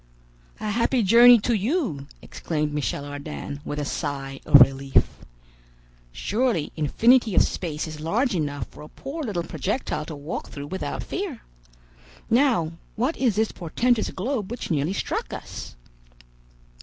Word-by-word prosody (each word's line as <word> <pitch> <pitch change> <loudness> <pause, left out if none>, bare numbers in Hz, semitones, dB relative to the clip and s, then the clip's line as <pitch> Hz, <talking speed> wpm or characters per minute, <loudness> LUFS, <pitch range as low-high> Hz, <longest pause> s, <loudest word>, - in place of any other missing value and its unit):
"A 215 0 -2
happy 235 +2 +2
journey 235 +4 +8
to 240 - +1
you," 210 - -1 0.2
exclaimed 150 -2 -3
Michel 145 -1 -2
Ardan, 145 0 -6
with 145 - -5
a 145 - -2
sigh 135 -2 -4
of 140 - +9
relief. 135 +1 +4 1.0
"Surely 215 - 0
infinity 225 - +3
of - - +6
space 160 -3 -3
is 155 -1 -8
large 215 - 0
enough 145 -6 -2
for - - -13
a 150 - -10
poor 285 +4 -7
little 205 - -2
projectile 185 - -3
to 160 - -6
walk 145 +3 -6
through 140 0 -7
without 190 +6 -4
fear. 370 - -5 0.9
Now, 235 - +3 0.2
what 255 +9 0
is 240 -6 +1
this 220 +1 +1
portentous 225 +7 0
globe 215 0 -3
which 240 -5 -5
nearly 155 +3 +1
struck - - -3
us?" - - -8
185 Hz, 145 wpm, -24 LUFS, 150-240 Hz, 1.0 s, of